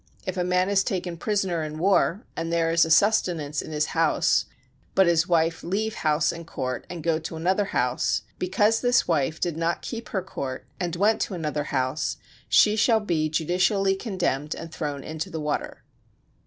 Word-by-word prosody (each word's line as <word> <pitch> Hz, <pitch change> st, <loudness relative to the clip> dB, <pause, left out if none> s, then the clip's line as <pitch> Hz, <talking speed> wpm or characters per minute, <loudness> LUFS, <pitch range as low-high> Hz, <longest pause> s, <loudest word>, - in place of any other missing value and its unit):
If 185 Hz, -, -3 dB
a 180 Hz, -, 0 dB
man 180 Hz, +1 st, +2 dB
is 200 Hz, -1 st, +3 dB
taken 180 Hz, -3 st, -3 dB
prisoner 190 Hz, -2 st, -1 dB
in 155 Hz, 0 st, -5 dB
war, 190 Hz, +3 st, +2 dB
and 165 Hz, 0 st, -3 dB
there 165 Hz, -1 st, +1 dB
is 165 Hz, 0 st, +4 dB
a -, -, -5 dB
sustenance 170 Hz, -5 st, +2 dB
in -, -, -9 dB
his 150 Hz, 0 st, +1 dB
house, 165 Hz, -1 st, +2 dB, 0.5 s
but 190 Hz, -, +6 dB
his 170 Hz, -1 st, +3 dB
wife 165 Hz, -1 st, +2 dB
leave 210 Hz, +5 st, -1 dB
house 155 Hz, -3 st, +1 dB
and 170 Hz, -1 st, -9 dB
court, 130 Hz, -5 st, -4 dB
and 170 Hz, -3 st, -6 dB
go 165 Hz, -1 st, +1 dB
to 165 Hz, 0 st, -6 dB
another 185 Hz, +5 st, +1 dB
house: 125 Hz, -8 st, 0 dB, 0.2 s
because 205 Hz, +5 st, +2 dB
this 245 Hz, 0 st, +3 dB
wife 160 Hz, -1 st, 0 dB
did 170 Hz, -3 st, -1 dB
not 165 Hz, +1 st, -1 dB
keep 230 Hz, -2 st, -6 dB
her 190 Hz, -3 st, -2 dB
court, 135 Hz, -8 st, -5 dB
and 175 Hz, -2 st, -2 dB
went 210 Hz, +5 st, +2 dB
to 195 Hz, -, -2 dB
another 150 Hz, -3 st, -2 dB
house, 130 Hz, +2 st, -1 dB, 0.3 s
she 210 Hz, 0 st, +5 dB
shall 220 Hz, +1 st, +4 dB
be 165 Hz, -7 st, 0 dB
judicially 185 Hz, +5 st, +2 dB
condemned 180 Hz, -, -2 dB
and 165 Hz, 0 st, -8 dB
thrown 145 Hz, -4 st, -4 dB
into 155 Hz, 0 st, -5 dB
the 160 Hz, -, -5 dB
water. 150 Hz, -1 st, -3 dB
170 Hz, 185 wpm, -25 LUFS, 155-190 Hz, 0.5 s, but